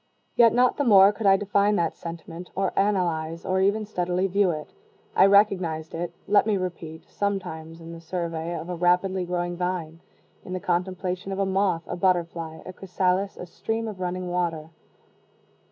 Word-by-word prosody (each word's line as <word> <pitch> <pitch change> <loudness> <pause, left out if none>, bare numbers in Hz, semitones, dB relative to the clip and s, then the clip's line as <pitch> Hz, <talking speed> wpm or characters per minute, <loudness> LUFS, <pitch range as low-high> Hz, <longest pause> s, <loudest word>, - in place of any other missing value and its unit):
Yet 230 -2 +6
not 250 +1 +3
the 290 - +1
more 200 -5 +7
could 205 0 -1
I 195 0 +6
define 205 +1 +2
that 170 -4 0
sentiment, 170 +1 -8
or 195 -1 0
analyze, 170 -5 0
or 190 0 +1
even 205 +3 +2
steadily 180 -2 -1
view 195 0 +2
it. 155 - -5 0.4
I 190 - +7
recognized 185 -6 +2
it, 170 +1 -3 0.2
let 205 +1 +4
me 210 -2 +2
repeat, 170 -3 -6
sometimes 175 -5 -4
in 165 0 -10
the 165 - -10
survey 170 -1 -3
of 160 - -7
a 180 - -3
rapidly 180 +2 +1
growing 175 0 -2
vine 175 -2 -3 0.4
in 185 - -7
the 185 - -2
contemplation 180 +1 -2
of 190 - -3
a 195 - +1
moth, 190 -3 +1
a - - -4
butterfly, 170 -3 -1
a 185 - -8
chrysalis, 185 +1 -1
a - - -7
stream 225 +6 -3
of 210 -4 -7
running 180 0 -3
water. 165 -3 -2
180 Hz, 175 wpm, -25 LUFS, 170-195 Hz, 0.4 s, more